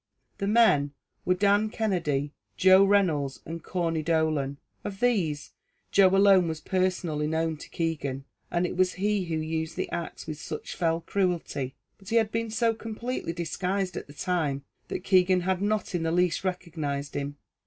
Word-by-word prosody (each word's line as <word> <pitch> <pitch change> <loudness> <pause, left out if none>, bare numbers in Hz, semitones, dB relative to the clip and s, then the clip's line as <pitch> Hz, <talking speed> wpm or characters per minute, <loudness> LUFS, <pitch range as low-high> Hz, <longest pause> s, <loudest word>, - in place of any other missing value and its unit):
The 195 - -1
men 200 -11 +4 0.3
were 180 - +3
Dan 205 +2 +3
Kennedy, 155 -10 -1 0.2
Joe 190 +1 +7
Reynolds, 175 -9 +2
and 165 0 -6
Corney 165 -3 -1
Dolan; 155 -4 0 0.3
of 195 -1 -6
these, 185 -12 +1 0.4
Joe 195 -1 +6
alone 195 -3 +6
was 160 -1 -3
personally 180 -5 0
known 160 0 0
to - - -11
Keegan, 145 -5 -2 0.2
and 175 +1 +1
it - - -3
was 185 0 +2
he 205 0 0
who 165 -1 -2
used 160 +1 -2
the - - -3
axe 170 -1 -5
with 155 -1 -6
such - - -6
fell 165 -2 +1
cruelty; 170 -9 -1 0.2
but 195 - -12
he 230 - 0
had 220 -2 +3
been 230 0 -1
so 225 +1 +2
completely 225 -2 -4
disguised 180 +3 -2
at - - -5
the 145 - -12
time, 150 -4 -1 0.2
that - - -4
Keegan 185 -1 +4
had 185 +1 0
not 210 0 0
in 175 - 0
the 165 0 0
least 180 +1 +2
recognised 160 -6 -3
him. 145 0 -4
175 Hz, 170 wpm, -27 LUFS, 155-195 Hz, 0.4 s, Joe